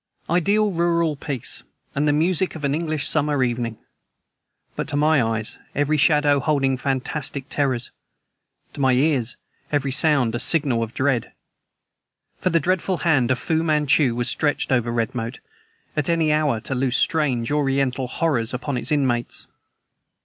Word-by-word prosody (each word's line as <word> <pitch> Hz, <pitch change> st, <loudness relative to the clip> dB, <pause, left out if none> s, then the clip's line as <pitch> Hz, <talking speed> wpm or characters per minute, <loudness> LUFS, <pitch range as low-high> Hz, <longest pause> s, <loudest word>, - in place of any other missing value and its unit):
Ideal 200 Hz, +5 st, +2 dB
rural 170 Hz, -2 st, +1 dB
peace, 140 Hz, -3 st, -3 dB, 0.3 s
and 145 Hz, +2 st, 0 dB
the -, -, +4 dB
music 170 Hz, +5 st, +1 dB
of 155 Hz, -, -8 dB
an 140 Hz, 0 st, +1 dB
English 155 Hz, -1 st, -2 dB
summer 150 Hz, -3 st, +1 dB
evening; 120 Hz, -2 st, -2 dB, 1.0 s
but -, -, -3 dB
to -, -, -3 dB
my 150 Hz, -1 st, +3 dB
eyes, 115 Hz, -1 st, -3 dB, 0.2 s
every 145 Hz, +2 st, +1 dB
shadow 150 Hz, -1 st, +4 dB
holding 135 Hz, -1 st, +1 dB
fantastic 135 Hz, +1 st, -3 dB
terrors; 130 Hz, -4 st, -1 dB, 0.8 s
to 145 Hz, -, -6 dB
my 130 Hz, -1 st, +4 dB
ears, 130 Hz, -3 st, +1 dB, 0.3 s
every 140 Hz, -2 st, 0 dB
sound 135 Hz, -5 st, +3 dB
a 120 Hz, -, -2 dB
signal 135 Hz, -5 st, +2 dB
of 115 Hz, 0 st, -4 dB
dread. 130 Hz, -4 st, 0 dB, 1.1 s
For -, -, +1 dB
the 165 Hz, -1 st, +3 dB
deathful 185 Hz, +2 st, -1 dB
hand 145 Hz, -8 st, +2 dB
of 130 Hz, -, +2 dB
Fu 160 Hz, +4 st, 0 dB
Manchu 150 Hz, -5 st, +2 dB
was 120 Hz, 0 st, -1 dB
stretched 145 Hz, 0 st, 0 dB
over 120 Hz, -2 st, +1 dB
Redmoat, 115 Hz, +1 st, -2 dB, 0.6 s
at 150 Hz, -1 st, -1 dB
any 165 Hz, -2 st, +2 dB
hour 150 Hz, -7 st, +1 dB
to 135 Hz, -, -3 dB
loose 130 Hz, -1 st, 0 dB
strange, 135 Hz, -7 st, +1 dB
Oriental 135 Hz, -3 st, 0 dB
horrors 125 Hz, -5 st, -1 dB
upon 130 Hz, +1 st, -3 dB
its 125 Hz, -, -2 dB
inmates. 130 Hz, -5 st, 0 dB
140 Hz, 150 wpm, -22 LUFS, 125-155 Hz, 1.1 s, the